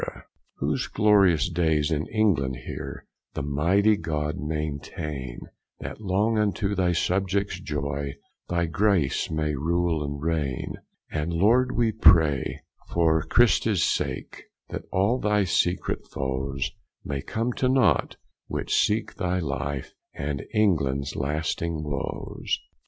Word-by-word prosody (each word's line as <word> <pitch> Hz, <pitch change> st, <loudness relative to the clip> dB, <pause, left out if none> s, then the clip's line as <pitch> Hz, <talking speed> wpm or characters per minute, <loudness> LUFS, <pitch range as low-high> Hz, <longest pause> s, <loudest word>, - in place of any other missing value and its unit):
Whose -, -, -1 dB
glorious 95 Hz, -7 st, +4 dB
daies 80 Hz, -3 st, +1 dB
in 80 Hz, 0 st, 0 dB
England 90 Hz, -, +1 dB
heere -, -, -6 dB, 0.3 s
The -, -, -2 dB
mighty 90 Hz, +10 st, +3 dB
God 75 Hz, -3 st, -2 dB
maintaine, 75 Hz, -4 st, -4 dB, 0.4 s
That -, -, -7 dB
long 105 Hz, +3 st, +1 dB
unto 100 Hz, -1 st, 0 dB
thy 90 Hz, -2 st, +2 dB
subjects 95 Hz, +2 st, 0 dB
joye 70 Hz, -3 st, -3 dB, 0.3 s
Thy 85 Hz, -1 st, +1 dB
Grace 85 Hz, -3 st, +1 dB
may 75 Hz, -1 st, -1 dB
rule 80 Hz, +2 st, 0 dB
and 70 Hz, 0 st, -4 dB
raigne. 75 Hz, -5 st, -2 dB, 0.4 s
And, 80 Hz, +2 st, -2 dB
Lord, 115 Hz, +9 st, +3 dB
we 115 Hz, -2 st, +2 dB
pray, 80 Hz, -10 st, +4 dB, 0.2 s
for 80 Hz, -2 st, +2 dB
Christes 110 Hz, -1 st, +3 dB
sake, -, -, -2 dB, 0.2 s
That -, -, -5 dB
all 100 Hz, +7 st, +2 dB
thy 105 Hz, -2 st, +2 dB
secret 90 Hz, 0 st, 0 dB
foes 65 Hz, +1 st, -2 dB, 0.3 s
May 70 Hz, -1 st, -3 dB
come 115 Hz, -, -2 dB
to 130 Hz, -, +1 dB
naught, 130 Hz, -5 st, +3 dB, 0.3 s
which -, -, -3 dB
seeke 110 Hz, +1 st, +2 dB
thy 90 Hz, -2 st, -1 dB
life 70 Hz, -4 st, -3 dB, 0.2 s
And 70 Hz, -1 st, -3 dB
Englands 75 Hz, -, +1 dB
lasting 75 Hz, +2 st, -2 dB
woes. 70 Hz, -2 st, -3 dB
80 Hz, 120 wpm, -26 LUFS, 75-100 Hz, 0.4 s, glorious